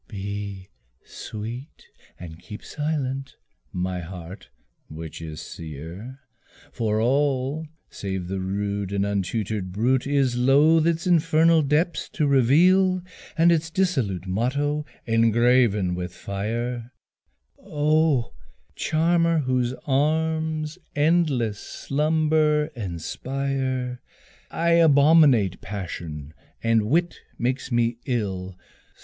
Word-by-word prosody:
Be 100 -1 -6 0.4
sweet 115 +7 -8 0.3
and 85 -2 -9
keep 105 - -10
silent, 135 -3 -3 0.4
my 90 0 -2
heart, 90 -1 -9 0.4
which 80 +1 -8
is 80 -1 -7
sear, 85 - -9 0.5
For 110 -2 -1
all 135 +4 0 0.2
save 95 -3 -4
the 95 +1 -3
rude 100 +1 -2
and 100 0 0
untutored 100 0 -2
brute, 120 +7 +1
Is 135 -3 +1
loth 145 +6 +4
its 170 +1 0
infernal 165 -1 +4
depths 150 +4 0
to 150 - +1
reveal, 175 +8 +4 0.3
And 170 +1 +5
its 160 -1 +1
dissolute 135 - 0
motto 140 +10 -1 0.2
engraven 115 -3 +3
with 90 0 -5
fire, 115 +5 -4 0.7
Oh 150 - +1 0.4
charmer! 165 +1 +2
whose 130 -2 0
arms 155 +3 0 0.2
endless 145 -9 +2
slumber 155 +1 +1
inspire! 130 +6 -3 0.5
I 170 +1 -1
abominate 145 - +5
passion 80 -7 -6 0.3
and 115 -2 +2
wit 170 +7 +1 0.2
makes 130 +2 -2
me 120 0 +1
ill. 95 -7 -3
125 Hz, 95 wpm, -24 LUFS, 100-155 Hz, 0.7 s, And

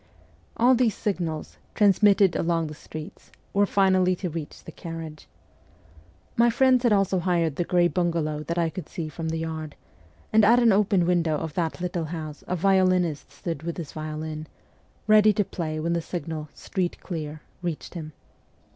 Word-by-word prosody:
All 245 +3 +5
these 240 -3 +2
signals, 170 -7 -3 0.2
transmitted 200 -2 +5
along 165 -1 +1
the 155 - -6
streets, 155 +4 -10 0.2
were 200 0 +3
finally 185 -2 +3
to 180 -1 -4
reach 155 -2 -7
the - - -9
carriage. 165 -2 -8 1.1
My 235 +1 +5
friends 255 +1 +4
had 240 -2 +3
also 195 -2 +3
hired 170 -4 +1
the 175 - 0
grey 175 0 +3
bungalow 165 -4 -1
that 170 - -3
I 165 -1 +1
could 180 -3 -7
see 160 -3 -5
from 160 +1 -4
the 165 - -2
yard, 160 -2 -5 0.6
and 220 0 +6
at 230 +4 +6
an 235 -2 +5
open 195 -3 +3
window 170 -3 +2
of 160 0 -5
that 165 0 -2
little 175 -2 -2
house 155 -2 -6
a 180 - -1
violinist 185 -3 +2
stood 165 -5 -5
with 170 +1 -4
his 165 -5 -6
violin, 155 0 -5 0.6
ready 215 0 +6
to 205 0 +1
play 155 -4 -4
when 170 +2 -1
the 170 - 0
signal: 160 -3 -5
' - - -34
Street 180 -2 -3
clear,' 155 -3 -6 0.2
reached 170 -3 -4
him. 155 -3 -7
170 Hz, 175 wpm, -25 LUFS, 160-195 Hz, 1.1 s, and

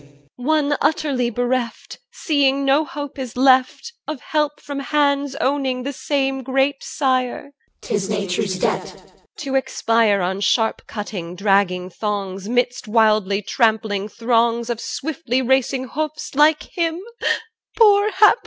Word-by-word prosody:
EL. 145 - -21 0.3
One 290 +2 +1
utterly 275 -6 +1
bereft, 245 0 -3
Seeing 280 -4 +1
no 275 +3 +4
hope 290 -2 -7
is 250 -2 -6
left, 260 - +3
Of 305 -3 -4
help 300 -1 -1
from 285 -1 -6
hands 280 0 +1
owning 270 -3 -1
the 280 +2 -4
same 270 -1 -1
great 270 +2 +1
sire. 260 0 -1
CH. 285 - -24
12. - - +1
'Tis 195 0 -4
nature's 195 -1 -1
debt. - - -2
II - - -18
2 - - -24
EL. - - -25 0.3
To 275 -2 -4
expire 230 -6 +2
On 190 +2 -2
sharp 225 +2 +1
cut 210 -1 -6 0.2
dragging 190 -2 +1
thongs, 200 -1 -4
'Midst 245 0 0
wildly 215 -2 +2
trampling 220 -3 +1
throngs 235 +1 +1
Of 235 - -4
swiftly 275 -4 -2
racing 260 0 +1
hoofs, 305 +1 -4
like 300 +2 +4
him, 335 -1 0 0.8
Poor 415 -2 +5
hapless 420 +1 +6
one? - - -1
260 Hz, 150 wpm, -20 LUFS, 220-285 Hz, 0.8 s, hapless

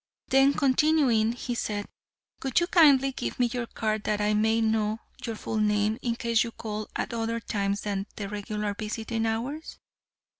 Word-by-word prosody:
Then 270 +1 +5
continuing, 265 -5 +3
he 245 0 -4
said, 205 -3 -2 0.6
"Would 265 +2 +2
you 345 - +1
kindly 285 -7 +5
give 260 - -5
me 245 - +4
your 245 -2 -2
card 215 -2 -2
that 210 -1 0
I 210 0 +2
may 220 +2 +2
know 220 -1 +1 0.3
your 230 - -3
full 220 - -4
name 210 +1 +1
in 235 -2 -1
case 235 -1 +2
you 235 - -5
call 215 -1 -5
at - - -2
other 230 0 -1
times 200 -2 -2
than 200 -1 -3
the 205 - -4
regular 210 0 -3
visiting 225 +2 -3
hours?" 250 +8 -3
225 Hz, 175 wpm, -27 LUFS, 210-245 Hz, 0.6 s, Then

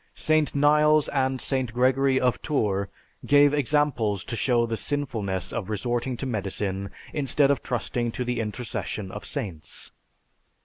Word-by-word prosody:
St. 155 -2 +2
Niles 150 +1 +4
and 130 -2 0
St. 130 -4 -1
Gregory 130 +2 +3
of 125 -2 +1
Tours 100 -10 0 0.4
gave 145 0 +5
examples 135 -8 +1
to - - -5
show 120 +1 +2
the 115 -1 -2
sinfulness 110 -10 -3
of 110 -4 -3
resorting 120 +3 -2
to 135 - -4
medicine 100 -4 -2 0.2
instead 140 -1 +2
of 140 - 0
trusting 120 0 -2
to 125 - -3
the 125 -1 -1
intercession 110 -3 -4
of 105 - -7
saints. 85 -7 -5
125 Hz, 140 wpm, -26 LUFS, 110-140 Hz, 0.4 s, gave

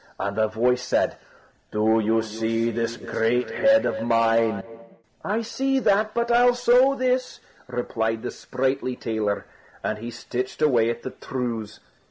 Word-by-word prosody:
And 100 0 -2
the 110 0 +2
voice 125 +3 +1
said: - - 0 0.5
"Do 110 +1 +2
you 110 +1 +2
see 115 +1 -1
this 115 +1 -2
great 120 +2 0
head 275 0 +4
of - - -1
mine?" 115 -3 +2 0.6
"I 215 +4 -1
see 270 +4 0
that, 215 -3 +2
but 235 0 0
I'll 245 +1 +5
sew 250 +3 +4
this!" 255 -1 -1 0.3
replied 115 -2 -2
the - - -3
sprightly 130 -1 -2
tailor; 110 -4 -2 0.4
and 110 - -2
he 115 +2 -6
stitched 120 +2 -5
away 125 -7 +3
at 120 0 -4
the 130 - -5
trews. 115 -5 -5
120 Hz, 150 wpm, -24 LUFS, -, 0.6 s, I'll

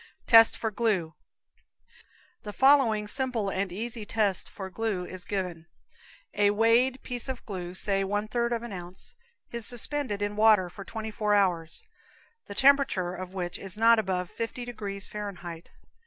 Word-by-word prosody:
Test 225 -1 +7
for 225 - -2
Glue. 195 -7 0 1.3
The 210 - -8
following 260 -6 +4
simple 240 -4 -1
and 190 -1 -2
easy 225 +4 -4
test 205 -3 0
for 190 -1 -8
glue 205 -3 -2
is 185 0 -8
given: 180 -4 -4 0.7
A 205 0 +3
weighed 230 +5 +2
piece 245 +1 -3
of 260 -2 -5
glue 180 -3 -6
(say 195 0 +1
one 205 +2 -2
third 235 +1 -1
of 235 -1 -2
an 235 -3 -7
ounce) 180 0 -8 0.4
is 235 -3 -1
suspended 245 -2 +1
in 205 0 -2
water 210 -4 +4
for 195 - -9
twenty 220 +3 -6
four 210 -1 +1
hours, 180 - 0 0.6
the 200 - -8
temperature 270 -10 +3
of 185 +1 -8
which 175 -2 -4
is 195 +1 -9
not 230 +1 +5
above 185 -4 -2
fifty 230 +2 -5
degrees 205 -5 -5
Fahrenheit. 180 -5 -7
210 Hz, 155 wpm, -27 LUFS, 185-230 Hz, 1.3 s, Test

